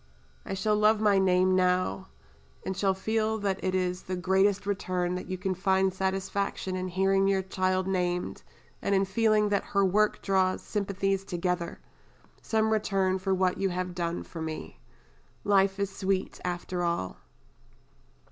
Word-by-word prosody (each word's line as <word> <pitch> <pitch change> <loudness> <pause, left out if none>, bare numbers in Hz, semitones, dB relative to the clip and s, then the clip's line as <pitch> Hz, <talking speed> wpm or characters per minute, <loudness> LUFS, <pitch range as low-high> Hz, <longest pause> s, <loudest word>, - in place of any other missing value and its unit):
I - - -2
shall 210 +3 +1
love 210 +1 +4
my 205 -2 +4
name 185 0 +3
now, 185 +1 +1 0.6
and 190 - -2
shall 190 0 +1
feel 220 +2 0
that 200 -2 -2
it 185 0 0
is 180 -1 -1
the 185 - -4
greatest 190 +2 +2
return 185 -3 -1
that 180 - -5
you 185 0 -3
can 185 +1 -1
find 190 0 +1
satisfaction 190 0 -2
in 185 0 -3
hearing 195 +1 +2
your 195 -1 +2
child 185 0 0
named, 180 -2 -1 0.4
and 200 - +1
in 195 0 +3
feeling 215 +1 +2
that 200 -1 +1
her 200 -1 +1
work 210 +3 +2
draws 190 -1 +1
sympathies 195 -1 -1
together 180 -2 -2 0.6
some 220 0 +1
return 195 -3 +1
for 190 0 0
what 185 -1 +1
you 195 - +1
have 180 0 -3
done 170 -1 -2
for 165 - -8
me. 160 -1 -6 0.6
Life 195 -1 +3
is 200 -1 -2
sweet 190 -1 -1
after 180 0 -3
all." 170 - -1
190 Hz, 155 wpm, -28 LUFS, 185-200 Hz, 0.6 s, love